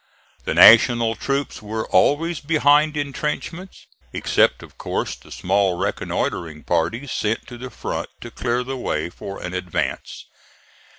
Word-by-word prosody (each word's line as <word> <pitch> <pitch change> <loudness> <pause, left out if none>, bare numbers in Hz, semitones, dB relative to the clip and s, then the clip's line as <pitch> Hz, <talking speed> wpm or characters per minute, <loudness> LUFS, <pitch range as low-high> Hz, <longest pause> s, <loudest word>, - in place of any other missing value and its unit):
The - - -1
National 115 0 +7
troops 135 +4 -3
were 110 +1 -4
always 165 +3 +2
behind 150 0 +3
intrenchments, 150 +5 -4 0.3
except - - +1
of - - -15
course - - -2
the - - -18
small 95 -1 +1
reconnoitring 80 -3 -3
parties 100 +11 -1
sent 110 +1 -1
to 120 - -10
the 130 +1 -7
front 115 - -5
to 120 - -8
clear 120 +1 -1
the 135 +1 -5
way 80 -8 -2
for 100 +2 -8
an 90 - -5
advance. 90 -2 -3
120 Hz, 135 wpm, -21 LUFS, 100-145 Hz, 0.3 s, National